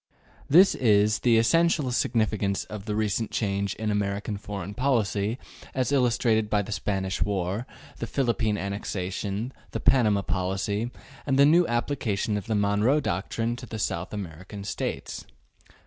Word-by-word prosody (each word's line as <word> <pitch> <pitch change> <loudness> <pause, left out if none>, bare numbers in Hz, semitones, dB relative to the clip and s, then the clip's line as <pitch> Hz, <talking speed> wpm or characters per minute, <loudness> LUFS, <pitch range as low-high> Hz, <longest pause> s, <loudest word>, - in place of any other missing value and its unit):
This 180 +7 +7
is 105 -3 +3
the 120 -2 +4
essential 150 +3 +3
significance 110 -5 0
of 105 -2 -8
the 105 -2 -2
recent 110 +1 0
change 100 -2 -1
in 110 -1 -2
American 105 +1 -1
foreign 100 -1 -6
policy 115 -4 0 0.4
as 130 +1 0
illustrated 120 -5 +2
by 105 -1 +2
the 100 - -8
Spanish 95 -2 -2
War, 100 +3 -1 0.3
the - - -3
Philippine 115 -5 0
annexation, 100 +3 -3 0.2
the - - -4
Panama 105 -6 +3
policy, 100 +4 -1 0.4
and 135 -1 +2
the 140 - +7
new 170 +4 +5
application 120 -4 -1
of 105 +2 -4
the 110 - 0
Monroe 105 +7 +3
doctrine 115 +2 -2
to 125 0 -9
the 110 - -6
South 90 -3 -2
American 95 0 -7
States. 100 - -4
105 Hz, 145 wpm, -26 LUFS, 100-120 Hz, 0.4 s, This